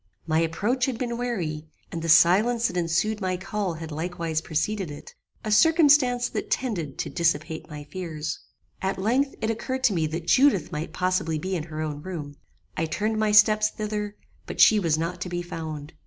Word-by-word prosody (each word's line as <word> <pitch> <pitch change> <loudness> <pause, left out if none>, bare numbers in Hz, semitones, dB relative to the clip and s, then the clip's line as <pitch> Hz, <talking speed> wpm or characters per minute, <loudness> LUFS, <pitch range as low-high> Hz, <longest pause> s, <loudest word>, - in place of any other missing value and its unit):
My 160 0 +1
approach 205 +11 0
had 255 -4 -2
been 235 -1 -3
wary, 175 -11 -3 0.2
and 165 - -4
the 165 - -3
silence 195 +9 +5
that 180 - 0
ensued 175 +5 0
my 185 -1 -1
call 195 -1 -3
had 160 0 -7
likewise 165 0 -2
preceded 175 +4 -2
it; 145 0 -10 0.3
a 215 - -3
circumstance 285 -3 +5
that - - -4
tended 175 - -2
to - - -3
dissipate 160 -1 -1
my 150 -1 -7
fears. 155 -1 -5 0.4
"At 190 0 -1
length 250 +8 +1
it 220 - +1
occurred 260 +4 -4
to 240 -6 +4
me 160 -3 0
that 165 +2 -5
Judith 255 - +3
might 150 +1 -4
possibly 180 -3 0
be 185 +5 -3
in 160 -3 -3
her 155 -2 -6
own 150 -1 -4
room. 150 -5 -7 0.4
I 160 - -1
turned 215 +6 -1
my 215 -1 +2
steps 215 0 +5
thither; 210 -1 -4 0.3
but - - -7
she 215 - +7
was 165 -5 +1
not 170 +3 -3
to 185 - -3
be 175 0 -3
found. 160 -3 -6
180 Hz, 190 wpm, -25 LUFS, 160-215 Hz, 0.4 s, she